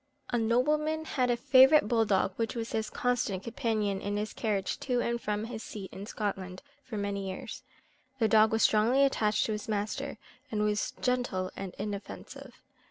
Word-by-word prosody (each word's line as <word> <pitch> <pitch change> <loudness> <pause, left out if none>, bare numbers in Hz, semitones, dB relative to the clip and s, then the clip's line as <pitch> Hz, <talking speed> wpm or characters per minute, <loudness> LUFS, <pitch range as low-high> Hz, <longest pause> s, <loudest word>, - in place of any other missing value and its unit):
A 240 - +2
nobleman 300 +7 +1
had 255 -5 0
a 240 - +2
favourite 265 +1 +6
bull 225 0 +3
dog, 195 -2 +1
which 225 0 -2
was 230 -1 -4
his 220 -1 -1
constant 235 -6 -1
companion 215 -5 -1
in 205 +1 -2
his 210 +1 -3
carriage 200 -4 -1
to 250 -3 0
and 235 0 -1
from 210 0 -2
his 225 -1 -6
seat 200 -4 -8
in 200 +2 -7
Scotland 195 -2 -4 0.2
for 250 -5 -6
many 200 -1 -2
years. 185 - -7 0.6
The 225 -3 +3
dog 215 0 +5
was 225 0 +2
strongly 230 +6 +4
attached 215 -6 +2
to - - -2
his 210 -1 -4
master, 210 0 -2 0.3
and 210 -3 -1
was 210 0 0
gentle 245 -8 0
and 195 -2 -6
inoffensive. 215 +6 -7
220 Hz, 175 wpm, -30 LUFS, 205-245 Hz, 0.6 s, favourite